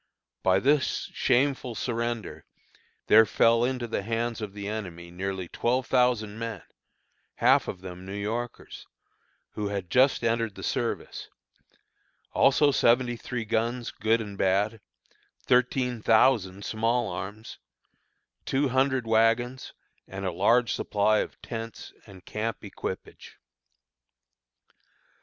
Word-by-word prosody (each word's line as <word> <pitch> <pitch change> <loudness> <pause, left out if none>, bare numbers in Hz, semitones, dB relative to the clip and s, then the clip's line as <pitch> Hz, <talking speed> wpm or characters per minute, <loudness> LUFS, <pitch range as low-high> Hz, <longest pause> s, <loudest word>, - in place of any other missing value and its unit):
By 95 0 +3
this 140 +7 +1
shameful 130 -2 +1
surrender 115 -3 -3 0.6
there 110 0 +7
fell 115 0 +3
into 125 -1 -1
the 115 - -2
hands 115 +2 -2
of 105 -2 -5
the 100 -1 -6
enemy 90 -5 -6
nearly 95 0 -4
twelve 125 +7 0
thousand 115 -4 +1
men, 115 -5 -5 0.7
half - - +4
of 90 - -6
them 90 -1 -9
New 95 +1 -7
Yorkers, 115 +4 -5 0.6
who 105 -1 -3
had 100 -4 -4
just 130 -1 +4
entered 115 -3 0
the - - -9
service; - - -3 1.0
also 145 +1 +4
seventy 120 -1 +3
three 115 0 -5
guns 115 +2 -1
good 115 +1 +1
and 100 -2 -8
bad; 100 +3 +1 0.6
thirteen 125 -1 +1
thousand 105 -4 +3
small 115 +2 0
arms; 100 +4 -7 0.8
two 135 +1 0
hundred 130 -1 +1
wagons, 115 +3 +1 0.4
and 95 0 -6
a 95 - 0
large 115 +7 +3
supply 105 +1 +1
of - - -4
tents 115 -1 -7
and 95 -2 -14
camp 110 +1 -4
equipage. - - -7
115 Hz, 120 wpm, -27 LUFS, 100-120 Hz, 1.0 s, there